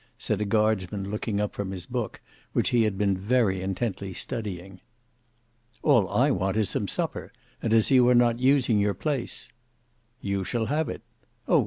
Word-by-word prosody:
said 105 -1 -2
a - - +1
guardsman 100 -2 0
looking 105 -1 -2
up 105 0 -1
from 100 -2 -4
his 95 -2 -6
book, 120 -4 -4 0.3
which - - +2
he 120 -2 +3
had 105 -3 -1
been 100 -1 +2
very 100 -1 +1
intently 95 +1 -3
studying. 95 -4 -5 1.0
"All - - +4
I - - +3
want 95 +3 0
is 110 -4 +1
some - - -1
supper, - - -3 0.3
and 115 - -1
as 110 +2 +3
you 125 -2 +6
are 125 - +5
not 120 -1 +4
using 130 -4 +3
your 100 0 +1
place—" 145 -5 -3 0.7
"You 100 -1 -2
shall 115 +5 -1
have 150 +5 0
it. - - -6 0.4
Oh! - - +5
105 Hz, 175 wpm, -26 LUFS, 95-120 Hz, 1.0 s, you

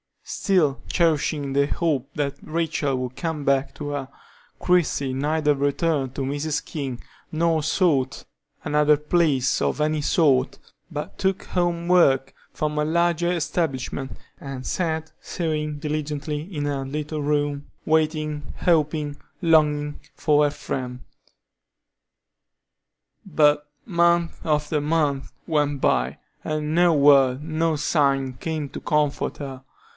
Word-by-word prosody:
Still 160 -8 +1
cherishing 150 -4 +1
the 140 0 +3
hope 145 -5 -1
that 145 -2 -1
Rachel 155 -4 -1
would 125 0 -5
come 160 -4 -3
back 135 -1 +1
to 145 -1 -5
her, 140 -2 -4 0.5
Christie 155 -7 +1
neither 150 +2 +1
returned 140 -1 0
to - - -3
Mrs. 145 +3 -2
King 135 -6 -5 0.3
nor 160 0 +1
sought 150 -4 +1 0.4
another 150 0 +4
place 150 -4 +1
of - - 0
any 155 0 +1
sort, 140 -4 +2 0.3
but 150 -3 -6
took 190 -1 0
home 175 -1 -1
work 135 -7 +4 0.2
from 150 0 -1
a 150 - +1
larger 170 +1 +1
establishment, 140 -6 -2 0.3
and 135 -2 -7
sat 160 -3 -2
sewing 155 -3 -3
diligently 150 0 -3
in 160 -4 -5
her 140 -2 -2
little 150 +2 -4
room, 145 0 -1 0.2
waiting, 155 -3 0
hoping, 150 -3 +1 0.2
longing 150 -3 +2 0.2
for 150 -1 +3
her - - +2
friend. 125 -3 -5 2.2
But 150 -4 +3 0.2
month 170 -3 +2
after 150 -1 +1
month 145 -3 0
went 145 -3 0
by, 65 +1 +1 0.2
and 155 0 -2
no 175 0 +5
word, 140 -2 +5
no 160 0 0
sign 140 -3 +1
came 155 +2 -4
to - - -7
comfort 150 -1 0
her. 135 -2 -7
150 Hz, 120 wpm, -24 LUFS, 140-160 Hz, 2.2 s, no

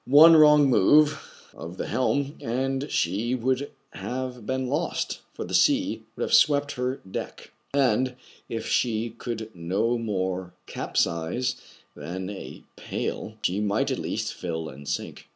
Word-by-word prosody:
One 155 +5 +9
wrong 150 -2 +7
move 150 +6 +5 0.3
of 85 +4 -8
the - - -3
helm, 140 +4 0
and 135 +4 -1
she 105 +9 0
would 130 +3 0 0.2
have 125 -3 -5
been 130 0 -1
lost, 150 +6 -2 0.2
for - - -4
the - - -8
sea 285 -1 +3
would - - -3
have - - -2
swept 145 -1 +5
her 125 +1 -2
deck; 95 -7 -7 0.2
and, 130 -2 +2 0.3
if 115 -1 -4
she 115 -1 0
could 115 -1 -6
no 100 +8 0
more 95 -4 -2
capsize 85 +10 -1 0.4
than 90 +6 -5
a 100 - -9
pail, 110 - -4
she 95 +3 +1
might 105 +7 +1
at 130 - -2
least 110 +1 -3
fill 80 -7 -4
and 70 +1 -11
sink. - - -4
120 Hz, 145 wpm, -26 LUFS, 95-135 Hz, 0.4 s, One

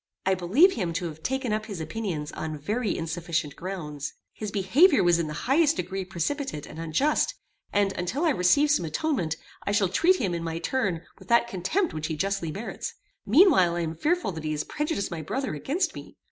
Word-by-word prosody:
I 190 - +3
believe 210 - +4
him 175 -6 -2
to 170 +2 -2
have 155 0 -11
taken 260 - -1
up 215 0 -2
his 200 -6 -6
opinions 160 -3 -3
on 155 -1 -4
very 210 - -1
insufficient 165 -2 -2
grounds. 155 -6 -5 0.2
His 215 - -5
behaviour 220 - +4
was 175 -1 +4
in 165 - -1
the 150 - -5
highest 295 +4 +4
degree 190 - -3
precipitate 180 - -3
and - - -10
unjust, 275 - +1 0.4
and, 200 -1 +2
until 235 - -1
I 320 - +4
receive 280 +8 +4
some 300 - +2
atonement, 165 - -1 0.3
I - - -2
shall 205 -2 +2
treat 345 - +4
him, 200 - -1
in 170 -1 -3
my 165 0 -3
turn, 190 -4 -1 0.2
with - - -15
that 235 0 +4
contempt 235 - -1
which 155 0 -3
he 160 - -2
justly 195 -3 -1
merits: 205 +8 -5 0.3
meanwhile 225 - +6
I 175 - -1
am 160 -1 -2
fearful 325 - 0
that 160 -3 -7
he 155 0 -1
has 150 - -1
prejudiced 300 - -2
my 165 -2 -4
brother 260 - -3
against 285 - -1
me. - - -10
190 Hz, 200 wpm, -27 LUFS, 165-265 Hz, 0.4 s, meanwhile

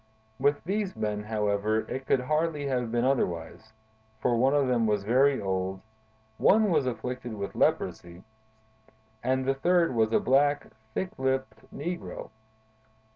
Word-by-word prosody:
With 145 +2 +2
these 195 +1 -2
men, 105 -1 -2
however, 105 0 0
it 130 +3 -6
could 130 - +3
hardly 150 +2 0
have 125 -4 -1
been 120 +1 +1
otherwise, 110 -5 -1 0.5
for 120 +2 +1
one 130 +4 +3
of 140 -2 +3
them 120 -3 +2
was 105 -2 +1
very 130 +6 +3
old, 95 -1 -2 0.6
one 215 -1 +4
was 150 -5 +2
afflicted 125 0 -4
with 100 -1 -5
leprosy, 85 +2 -1 1.0
and 130 0 +1
the 135 - +2
third 170 +3 +2
was 110 -2 +2
a - - +4
black, 145 +1 +2 0.2
thick 190 - -1
lipped 130 0 -2
negro. 175 -2 -5
130 Hz, 140 wpm, -28 LUFS, 110-145 Hz, 1.0 s, one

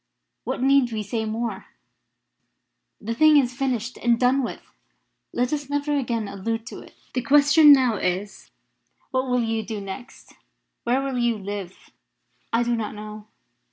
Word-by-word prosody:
What - - -2
need 270 -2 +4
we 215 -1 -3
say 220 +2 -3
more? 220 -2 -3 1.3
The 230 +2 -4
thing 310 +4 +6
is 250 -3 +2
finished 250 -3 -2
and 235 -1 +2
done 255 +2 +3
with. 245 - -5 0.7
Let 245 +3 -1
us 285 -2 -3
never 290 +1 0
again 235 -6 -1
allude 225 +3 -4
to - - -9
it. - - -15 0.2
The 255 - 0
question 290 +4 +6
now 255 -6 +5
is 190 +3 -3 0.6
what 260 0 -1
will 250 -1 +2
you 225 0 -1
do 215 0 -5
next? 195 +5 -9 0.5
Where 250 +3 +1
will 270 -2 -2
you 240 -2 +1
live?" 200 -2 -7 0.6
"I 230 +1 +2
do 240 0 0
not 215 -2 -4
know. 210 0 -9
240 Hz, 155 wpm, -24 LUFS, 215-265 Hz, 1.3 s, thing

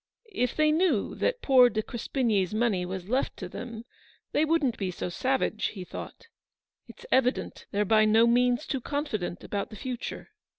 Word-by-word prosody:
" - - -56 0.2
If 250 - -1
they 305 0 +3
knew 315 - +1
that - - -1
poor 255 -3 +7
De 220 -2 -2
Crespigny's 225 -5 -1
money 210 -6 +1
was 185 0 -5
left 255 +5 -1
to. 185 - -6
them, 230 +4 -8 0.5
they - - +2
wouldn't 305 -7 +1
be 195 -2 -1
so 180 - -4
savage/' 255 +3 0
he 190 -4 -6
thought. - - -9 0.3
" - - -58
It's 485 - -13
evident 260 0 +1
they're 205 +1 0
by 215 +1 +4
no 220 +2 +5
means 245 +3 +3
too 270 -3 -2
confident 230 - -3
about 200 -1 -3
the - - -10
future." 250 - -6
235 Hz, 180 wpm, -28 LUFS, 210-265 Hz, 0.5 s, poor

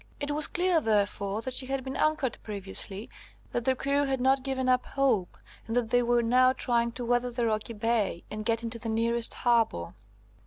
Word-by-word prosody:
It 290 0 -2
was 300 +1 +3
clear, 355 -2 +2
therefore, 205 -1 0
that 260 - -3
she 255 0 +1
had 270 -1 -2
been 265 +1 -5
anchored 310 -5 0
previously, 200 0 -2 0.4
that 240 - -2
the 260 - +2
crew 280 +2 0
had 265 -1 -1
not 265 +1 +3
given 260 -1 -2
up 255 0 +3
hope, 260 -10 0 0.3
and 225 - -3
that 235 -2 0
they 245 - +4
were 240 0 +2
now 255 +2 +4
trying 235 -2 0
to 245 0 -5
weather 245 +1 +1
the 240 -1 -2
rocky 215 +1 -1
bay, 220 -4 -1
and 215 0 -4
get 230 +1 0
into 230 0 -4
the 225 - -5
nearest 230 +1 +1
harbour. 230 - +1
240 Hz, 200 wpm, -28 LUFS, 225-260 Hz, 0.4 s, they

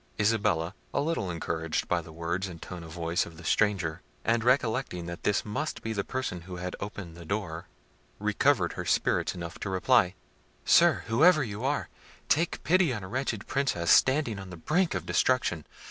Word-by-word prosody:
Isabella, 100 -5 +1 0.2
a - - +3
little 145 - -1
encouraged 80 -1 -2
by 90 -1 +1
the 80 - -12
words 85 +4 -2
and 85 -3 -9
tone 90 +1 -8
of 80 - -10
voice 85 +1 -1
of 80 -1 -13
the 90 - -11
stranger, 90 -3 +1 0.2
and 115 0 +2
recollecting 120 -7 +1
that 85 0 -6
this 105 - +1
must 130 +9 -3
be 110 - -2
the 100 -2 -1
person 130 -9 -3
who 90 +1 -8
had 90 +1 -4
opened 100 -5 -7
the 85 - -10
door, 85 -2 -4 0.5
recovered - - +2
her - - -4
spirits - - +1
enough 85 -1 -7
to 100 - -4
reply— 95 0 +3 0.5
"Sir, - - +5
whoever 155 +7 +5
you 105 -1 -5
are, 145 +2 0 0.4
take 165 +3 +1
pity 180 -3 +3
on 105 -5 -4
a - - -6
wretched 120 -1 -2
Princess, 130 -11 0
standing 130 -6 +4
on 95 -1 -8
the 90 - -8
brink 165 - +1
of - - -3
destruction. 100 - +1
100 Hz, 185 wpm, -28 LUFS, 85-125 Hz, 0.5 s, Sir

